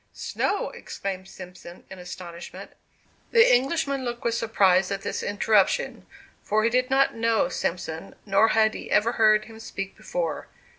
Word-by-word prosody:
"Snow!" 405 - -2
exclaimed 190 -1 -6
Simpson, 180 -2 -12
in 190 - -9
astonishment. 180 -1 -9 0.6
The 460 - +6
Englishman 275 +1 0
looked 240 -1 -5
with 235 - 0
surprise 195 -5 +3
at 195 -1 -4
this - - -3
interruption; 205 -1 +1 0.3
for 215 +1 +1
he 230 - +2
did 250 +2 +1
not 270 +1 +3
know 225 -5 +1
Simpson, 170 0 -4
nor 200 +2 +4
had 220 0 +3
he - - -8
ever 215 +3 +3
heard 215 -2 +4
him 220 0 -12
speak 195 -3 -6
before. - - -4
215 Hz, 150 wpm, -25 LUFS, 190-240 Hz, 0.6 s, The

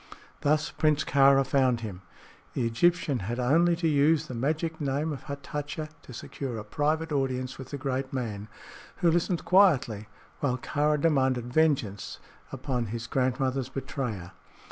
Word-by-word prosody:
Thus 150 +1 +1
Prince 155 -1 +2
Kāra 135 0 +5
found 130 -3 +2
him. 100 -5 -6 0.5
The 125 - -1
Egyptian 140 +3 +2
had 115 +6 -4
only 165 +7 +3
to 165 0 0
use 150 +1 +3
the 130 - -7
magic 155 +6 -2
name 145 +3 -1
of 140 - -9
Hatatcha 145 +2 -5
to - - -13
secure 125 0 -6
a 105 - -5
private 155 +5 -1
audience 130 -2 -1
with 130 - -8
the 145 - -4
great 135 -1 -2
man, 110 -6 -4 0.6
who 170 - +6
listened 175 +1 0
quietly 140 - +4 0.3
while 125 -3 0
Kāra 150 +3 0
demanded 130 -6 +1
vengeance 135 -11 +1 0.3
upon 130 -3 -2
his 115 +2 -5
grandmother's 130 +1 0
betrayer. 125 -9 -4
135 Hz, 145 wpm, -28 LUFS, 125-150 Hz, 0.6 s, who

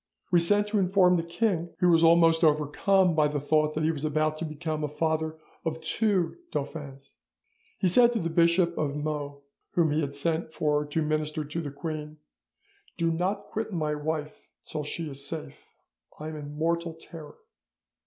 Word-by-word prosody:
We 175 - +6
sent 205 +5 +4
to 210 -1 +1
inform 185 -1 +4
the 170 - +1
king, 170 0 -1
who 180 - +3
was 165 -1 +5
almost 165 0 +5
overcome 160 +5 +3
by 155 -2 +3
the 145 0 -2
thought 155 +1 +1
that 155 - -1
he 160 - +3
was 150 -3 -6
about 155 0 +1
to 165 - -2
become 155 0 -4
the 150 - 0
father 160 +1 -1 0.3
of 160 0 -2
two 195 - 0
dauphins. 140 -1 -6 0.6
He 190 - +1
said 240 +7 +6
to 230 - 0
the 165 -2 -2
Bishop 170 +1 +3
of 145 -2 -1
Meaux, 145 -1 -4 0.3
whom 165 -3 +3
he 155 +2 +1
had 140 -1 -3
sent 160 +2 -1
for 150 -1 0
to 155 +2 -1
minister 155 0 -1
to 160 +4 -4
the 150 - -5
queen, 155 +1 -6 0.8
"Do 165 0 +1
not 180 +5 -1
quit 220 0 -4
my 155 -4 -1
wife 150 0 -4
till 155 -1 -4
she 160 +2 -4
is 140 -1 -7
safe; 160 -2 -7 0.5
I 155 +1 -5
am 155 - -7
in 145 0 -8
mortal 170 +1 -1
terror." 165 -2 -11
160 Hz, 185 wpm, -27 LUFS, 150-170 Hz, 0.8 s, We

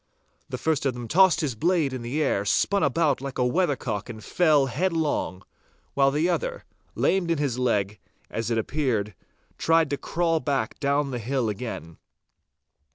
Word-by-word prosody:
The 125 - -4
first 150 +1 0
of 130 - -1
them 120 -1 -6
tossed 185 +4 +5
his 145 -5 -1
blade 160 +2 +1
in 130 - -4
the 130 +7 -1
air, 100 - +1
spun 200 - +2
about 145 -1 +2
like 140 -1 -6
a 125 - +2
weathercock 125 - -1
and 110 -2 -8
fell 155 -6 +3
headlong, 150 - -1 0.5
while 135 -1 +4
the 150 +5 +1
other, - - -2 0.3
lamed 190 -3 +1
in 165 - +2
his 140 -4 -1
leg, 105 -5 0 0.3
as 115 0 -3
it 115 - 0
appeared, 110 -4 -1 0.5
tried 165 -3 +3
to 145 - 0
crawl 165 +1 0
back 135 -7 -2
down 140 0 +1
the 125 - -3
hill 125 0 -1
again. 100 -7 -6
140 Hz, 165 wpm, -25 LUFS, 120-160 Hz, 0.5 s, tossed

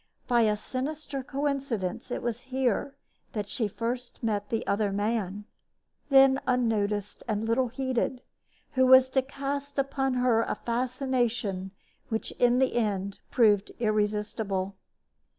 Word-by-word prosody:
By 240 -2 +4
a 210 -2 +3
sinister 275 +4 -4
coincidence 270 -9 -2
it - - -3
was 240 0 -2
here 260 +1 0 0.4
that 210 -2 -3
she 220 +1 -1
first 240 +4 -4
met 205 -2 -1
the 225 - -1
other 200 0 +1
man, 205 -1 -1 0.6
then 270 -1 +6
unnoticed 210 -5 0
and 215 -1 -1
little 250 +3 +2
heeded, 255 0 -2 0.5
who 260 -2 +3
was 260 0 +8
to 265 0 +2
cast 280 +1 -4
upon 270 -1 0
her 245 -2 +3
a - - -1
fascination 240 -5 -1 0.4
which 220 -1 -2
in 245 0 +4
the 260 -2 +2
end 200 -3 -1
proved 210 -5 +3
irresistible. 210 -3 -1
240 Hz, 130 wpm, -28 LUFS, 210-260 Hz, 0.6 s, was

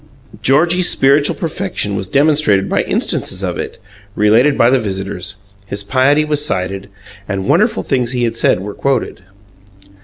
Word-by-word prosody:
Georgie's 170 +6 +3
spiritual 140 +2 +3
perfection 165 - -3
was 95 - -3
demonstrated 140 -7 +2
by - - +1
instances - - -2
of - - -3
it, - - -5 0.4
related 115 +7 +3
by 115 - +4
the 135 - +3
visitors; 95 -2 -4 0.3
his 100 0 -5
piety 135 +7 +2
was 150 -1 0
cited, 95 -5 -3 0.4
and 95 -1 -3
wonderful 215 +9 +2
things 125 -4 -1
he 125 -1 -1
had 115 -1 -1
said 90 - +1
were 100 +1 -6
quoted. 135 -7 -2
125 Hz, 150 wpm, -15 LUFS, 100-150 Hz, 0.4 s, by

